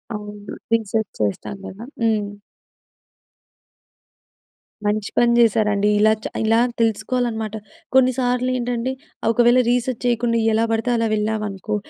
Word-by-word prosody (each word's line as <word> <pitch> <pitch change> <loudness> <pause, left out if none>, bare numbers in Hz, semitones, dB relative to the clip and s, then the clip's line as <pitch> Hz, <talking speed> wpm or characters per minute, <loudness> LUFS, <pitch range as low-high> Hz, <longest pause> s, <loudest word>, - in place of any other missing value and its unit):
అవును. 210 0 -8 0.2
రీసెర్చ్ 220 -1 0
చేస్తాం 105 - -2
కదా! 200 +4 -9 0.2
హ్మ్. 215 -3 +1 2.6
మంచి 210 0 0
పని 240 0 +4
జేశారండి! 210 -3 +3
ఇలా 215 +1 +5
చ - - -2 0.2
ఇలా 225 +1 +3 0.2
తెలుసుకోవాలనమాట. 225 -1 -1 0.4
కొన్నిసార్లేంటంటే, 250 -1 +1 0.4
ఒకవేళ 240 +2 +4
రీసెర్చ్ 245 0 0
చేయకుండా, 235 -1 +1 0.2
ఎలా 225 +1 +2
పడితే 225 +2 0
అలా 230 -1 +1
వెళ్ళామనుకో! 210 -1 -2
225 Hz, 100 wpm, -21 LUFS, 210-240 Hz, 2.6 s, ఇలా